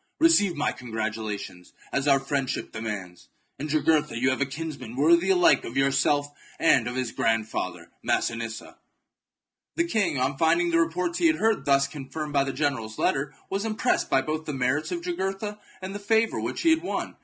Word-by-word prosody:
Receive 255 - +5
my 150 - 0
congratula 110 -3 -4
tions, 90 -2 -11 0.2
as 140 +1 0
our 140 -1 +5
friendship 135 -1 -2
demands. 105 -6 -6 0.3
In 150 - -3
Jugurtha 155 -2 +1
you 130 +3 +2
have 130 - -2
a 140 - +2
kinsman 140 -5 -6
worthy 170 +6 +4
alike 180 -6 +5
of 120 - -6
yourself 135 +1 +2 0.3
and 130 -7 +4
of 120 - -4
his 130 -2 -2
grandfather 115 -1 -2
Massinissa." 115 -1 -2 1.0
The 335 - +2
king, 205 - 0
on 135 +2 -1
finding 170 +2 +3
the 165 - +3
reports 170 +1 0
he 170 - +5
had 155 - +3
heard 215 -4 +1
thus 140 0 +3
confirmed 145 +1 -6
by 140 -1 +3
the 135 - -2
general's 130 -7 -2
letter, 135 +1 0 0.2
was 195 +1 -2
impressed 220 -1 0
both 135 0 +2
by 155 +1 -2
the 155 -2 -5
merits 130 +4 0
of 345 -1 -3
Jugurtha 210 - -3 0.2
and 190 +1 -5
the 205 - -5
favour 220 +2 +1
which - - -3
he 330 - +5
had 320 0 +3
won. 350 - -3
145 Hz, 185 wpm, -26 LUFS, 130-175 Hz, 1.0 s, Receive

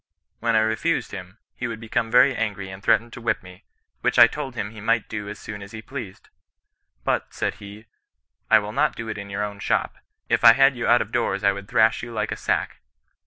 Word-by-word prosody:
When 115 0 +1
I 110 - +5
refused 110 +10 0
him, 95 0 -9 0.2
he 125 - -4
would 115 -1 -6
become 115 0 -2
very 125 +3 +5
angry 100 -4 -3
and 95 +1 -10
threaten 115 +1 +2
to 120 - -9
whip 115 - -1
me, 90 0 -14 0.3
which - - 0
I - - +11
told 135 +1 -5
him 105 -3 -4
he 110 -2 -11
might 115 +1 +1
do 105 -2 -5
as 105 - -7
soon 105 -1 -8
as 100 +3 -11
he 110 - -7
pleased. 120 -8 -8 0.7
But, - - -1
said - - -1
he, 100 +2 -11 0.3
' - - -52
I 110 - +8
will 105 0 -3
not 150 +5 +1
do 115 -1 -6
it 110 - -4
in 100 0 -8
your 100 +1 -2
own 100 -1 -5
shop; - - -1 0.3
if - - +1
I 115 - +10
had 135 +2 +4
you 120 - -2
out 120 +1 +5
of 105 - -18
doors 105 -4 -1
I 100 - +5
would 100 0 -7
thrash 110 -1 +3
you 120 - -7
like 110 -1 -2
a - - -1
sack.' - - -2
110 Hz, 240 wpm, -24 LUFS, 100-120 Hz, 0.7 s, I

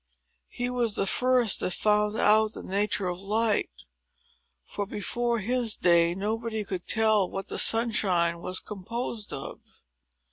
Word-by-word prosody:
He 245 - -4
was 235 -4 0
the 195 - 0
first 250 0 +2
that 180 - -1
found 210 0 +1
out 215 +1 +3
the - - -8
nature 200 0 -1
of 180 0 -4
Light; 215 +2 0 1.0
for, 205 - -5
before 235 +3 -2
his 235 +1 -1
day, 170 -1 +3
nobody 220 +2 -3
could 185 -3 -6
tell 220 -4 +2
what 195 0 -6
the - - -1
sunshine 190 -7 +3
was 185 +2 0
composed 220 +2 -5
of. 135 - -7
210 Hz, 140 wpm, -27 LUFS, 190-225 Hz, 1.0 s, out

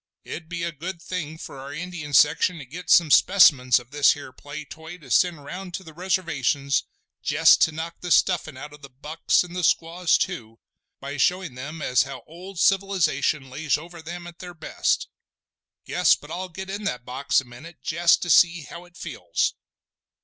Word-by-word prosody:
It'd 160 -1 -8
be 170 0 -4
a 170 - -2
good 170 +3 -7
thing 165 -3 -5
for 140 - -9
our 135 +1 -8
Indian 165 -1 -6
section 160 +4 +4
to 145 - -9
get 170 +8 -9
some 165 -4 +5
specimens 140 -11 +6
of 120 0 -8
this 145 -1 +4
here 145 -2 -10
play 145 +3 -9
toy 160 +4 -10
to 140 -7 -14
send 165 0 +2
round 180 +3 -7
to 190 - -6
the 160 -3 -13
Reservations 150 -6 0 0.4
jest - - +5
to 160 - +4
knock 165 +2 -7
the 180 - -5
stuffin' 170 -5 +2
out 150 +2 -9
of 150 - -15
the 140 - -11
bucks, 150 +8 0
and 175 0 -10
the 180 - -2
squaws 165 +2 +2
too, 115 - -4 0.4
by 140 +1 -6
showing 180 +1 +1
them 150 +5 -7
as 125 -1 +3
how 140 -1 -5
old 180 +3 -10
civilisation 175 -9 +1
lays 145 +1 0
over 170 +2 -11
them 175 +2 -8
at 175 0 -12
their 180 -1 -9
best. 160 - -1 0.8
Guess - - +3
but - - -14
I'll 185 +1 -5
get 190 +3 -8
in 200 +2 -5
that 125 -10 -3
box 135 +3 +1
a 130 - -7
minute 130 +8 -13
jest 170 +1 +3
to 175 - 0
see 170 -2 +5
how 170 +4 -10
it 175 0 -19
feels!" - - -2
165 Hz, 195 wpm, -24 LUFS, 140-180 Hz, 0.8 s, specimens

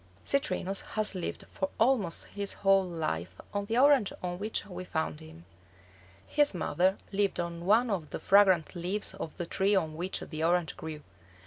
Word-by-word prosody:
Citrinus 195 -7 0
has 215 -1 +1
lived 180 -3 -4
for 190 - -2
almost 225 -8 +2
his 200 -1 -4
whole 195 0 +6
life 90 - -3 0.2
on 200 0 -1
the 225 +3 -1
orange 270 -5 +5
on 175 0 -3
which 215 +1 -2
we 185 -2 -7
found 80 - -2
him. 80 +1 -13 0.8
His 290 -8 +2
mother 185 +3 +1
lived 200 -1 0
on 170 0 -4
one 225 +3 +4
of 170 -7 -2
the - - -4
fragrant 190 -5 +4
leaves 185 +4 -3
of 180 -5 -7
the 175 - -3
tree 195 +4 +1
on 160 -5 0
which 180 +4 -3
the 155 -1 -5
orange 170 0 +2
grew. 155 -2 -7
185 Hz, 175 wpm, -30 LUFS, 165-205 Hz, 0.8 s, whole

